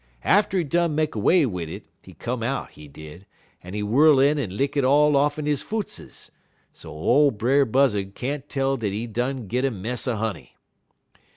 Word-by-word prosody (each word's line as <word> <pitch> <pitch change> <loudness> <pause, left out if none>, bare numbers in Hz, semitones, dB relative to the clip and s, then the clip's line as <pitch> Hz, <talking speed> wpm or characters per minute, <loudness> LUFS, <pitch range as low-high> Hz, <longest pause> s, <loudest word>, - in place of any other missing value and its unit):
Atter 200 -1 +2
he 175 - +1
done 170 +1 0
make 155 0 0
'way 155 - +3
wid 90 -9 -4
it, - - -8 0.2
he - - -15
come 125 0 -4
out, 130 +4 -3
he 75 - -13
did, 80 +6 -13 0.4
en 90 +3 -8
he 105 - -2
whirl 140 +7 +4
in 145 +2 +3
en 100 -8 -4
lick 140 +1 -1
it 140 - +1
all 145 +3 +4
off'n 145 +2 +1
his 150 -2 0
footses, 215 -2 -6 0.4
so - - -12
ole 130 - +3
Brer 135 +5 +2
Buzzud 105 -6 +1
can't 140 +2 -4
tell 135 -1 0
dat 110 -4 -2
he 105 +4 -3
done 125 +4 -3
bin - - -13
git 125 +6 -1
a - - +2
mess 115 +3 -5
er 125 - 0
honey. 110 -1 -5
130 Hz, 200 wpm, -23 LUFS, 105-145 Hz, 0.4 s, whirl